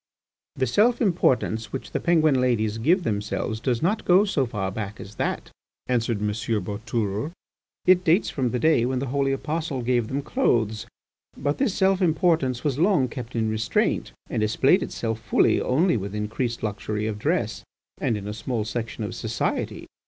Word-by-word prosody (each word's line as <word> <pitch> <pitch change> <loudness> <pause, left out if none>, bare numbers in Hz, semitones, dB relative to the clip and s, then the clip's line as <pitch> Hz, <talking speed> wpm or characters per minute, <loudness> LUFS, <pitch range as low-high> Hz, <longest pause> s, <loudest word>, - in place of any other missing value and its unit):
"The 130 - +1
self 220 - +3
importance 130 - +1
which 100 -3 -6
the - - -1
Penguin 155 -6 +3
ladies 115 -3 +1
give 175 - +3
themselves 105 -1 -2
does 120 +3 -1
not 205 +6 +1
go 185 +3 +5
so 145 -10 0
far 95 -5 -3
back 105 +1 -5
as 100 - -9
that," - - -2 0.3
answered 115 -3 0
M. 105 - +1
Boutourlé. 105 - -2 0.5
"It 185 0 +5
dates 170 +5 +3
from 130 -3 0
the 125 - -1
day 155 -3 +3
when 130 +1 0
the 130 - -1
holy 140 -1 +1
apostle 150 -1 -2
gave 120 -2 +1
them 140 +4 -3
clothes. 115 - 0 0.5
But 145 +1 -1
this 250 -8 +1
self 195 -1 +2
importance 160 -7 +2
was 145 -2 0
long 165 -8 +3
kept 120 0 -7
in 110 -1 +1
restraint, 110 0 0 0.2
and - - -2
displayed 130 - +3
itself 115 -1 -3
fully - - +2
only 155 +3 +2
with 100 0 -5
increased 110 +3 -2
luxury 105 0 -2
of 110 -1 -3
dress - - -1 0.4
and 115 - 0
in 100 0 -6
a 105 - -3
small 110 0 -3
section 115 0 -4
of 105 - -4
society. 110 -1 -2
120 Hz, 175 wpm, -25 LUFS, 110-155 Hz, 0.5 s, go